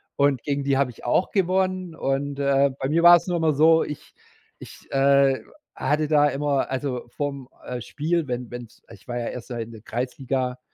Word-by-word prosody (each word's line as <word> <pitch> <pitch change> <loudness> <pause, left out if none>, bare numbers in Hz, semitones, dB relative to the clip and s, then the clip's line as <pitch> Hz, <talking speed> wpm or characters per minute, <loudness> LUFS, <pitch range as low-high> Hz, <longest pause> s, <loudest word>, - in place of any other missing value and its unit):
Und 140 -3 +2
gegen 140 -1 -2
die 140 -1 +1
habe 135 -2 +1
ich - - -15
auch 150 +9 +1
gewonnen. 185 -2 0
Und, 140 +1 -2
äh, 140 0 +3
bei - - -1
mir 165 +3 +2
war 175 0 +10
es 170 - -7
nur 175 -1 0
immer 160 -2 +2
so, 160 +3 +5
ich 150 - -8 0.5
ich, - - -13
äh, 135 0 +3 0.3
hatte 150 +1 0
da 150 -1 +4
immer 140 -1 -1
also, 130 -2 -3
vorm, 140 0 -4 0.2
äh, 125 -1 -5
Spiel, 160 +5 -2
wenn 125 -1 -4
wenn 120 0 -6
es 110 - -24
ich 95 - -15
war 120 -1 -4
ja 120 -1 -3
erst 125 - -8
mal 120 -2 -4
in 115 - -12
der 110 -2 -12
Kreisliga, 125 +2 -3
140 Hz, 205 wpm, -24 LUFS, 125-155 Hz, 0.5 s, war